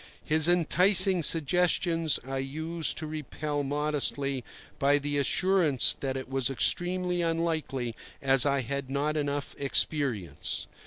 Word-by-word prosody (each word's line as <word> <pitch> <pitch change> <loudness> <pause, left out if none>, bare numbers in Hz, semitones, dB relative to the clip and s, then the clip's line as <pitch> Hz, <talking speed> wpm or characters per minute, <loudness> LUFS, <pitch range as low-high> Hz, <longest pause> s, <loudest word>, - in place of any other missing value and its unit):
His 155 0 +4
enticing 180 +2 +4
suggestions 165 +1 +1
I 135 0 -4
used 160 +4 -4
to 160 - -5
repel 150 -1 -5
modestly 140 -2 -2 0.4
by 140 +1 +2
the 145 0 -2
assurance 160 - +2
that 135 -1 -4
it 130 - -7
was 135 -1 -1
extremely 180 +6 +1
unlikely, 160 -8 -3 0.2
as 135 -3 +7
I 140 -1 +1
had 140 +2 -5
not 145 +3 -2
enough 145 -1 -3
experience. 130 - -1
145 Hz, 120 wpm, -27 LUFS, 135-165 Hz, 0.4 s, as